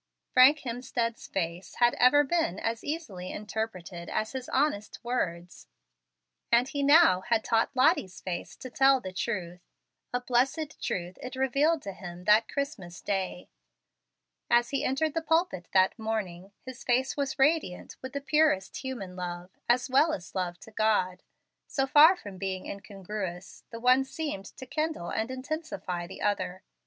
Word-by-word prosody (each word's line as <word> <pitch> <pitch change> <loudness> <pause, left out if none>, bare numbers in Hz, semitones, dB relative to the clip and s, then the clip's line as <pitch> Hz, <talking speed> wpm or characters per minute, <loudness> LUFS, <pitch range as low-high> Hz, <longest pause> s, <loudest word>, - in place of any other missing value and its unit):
Frank 275 +4 +7
Hemstead's 235 -2 -3
face 175 0 -4
had 240 0 +4
ever 290 +4 +6
been 290 - 0
as 230 0 -2
easily 210 - -5
interpreted 200 -5 -5
as 215 - -1
his 260 -2 -6
honest 260 -7 0
words; 180 -8 -3 0.8
and 240 +2 +5
he 285 +1 -3
now 285 - +6
had 230 -2 +2
taught 225 0 +2
Lottie's 190 -7 +2
face 180 -2 -5
to 255 - -9
tell 270 +1 +5
the 185 -6 -7
truth. 180 -3 -3 0.5
A 245 - 0
blessed 260 +5 0
truth 180 0 -3
it 255 +1 -6
revealed 280 +4 +2
to 200 - -5
him 180 -1 -9
that 210 +3 +5
Christmas 220 - -4
day. 190 -2 -3 1.0
As 240 +2 +3
he 275 - 0
entered 295 +4 0
the 330 - 0
pulpit 320 - 0
that 190 +3 +3
morning 200 -4 -3
his 260 -2 -9
face 260 +2 +1
was 280 -2 -2
radiant 270 - +1
with 260 +1 -7
the 280 - -3
purest 290 -9 +2
human 240 -9 -6
love, 175 0 -6 0.2
as 245 +1 +3
well 285 +5 +4
as 175 - -7
love 175 -2 -2
to 220 - -13
God. 210 -4 +1 0.5
So 270 - 0
far 300 +6 +7
from 200 - -10
being 190 -1 -3
incongruous, 195 -2 -7
the 230 - -7
one 255 +2 +5
seemed 270 -8 -5
to 260 - -8
kindle 305 - -2
and 220 +2 -1
intensify 255 - -4
the 190 - -8
other. 195 -3 -1
230 Hz, 155 wpm, -29 LUFS, 185-270 Hz, 1.0 s, Frank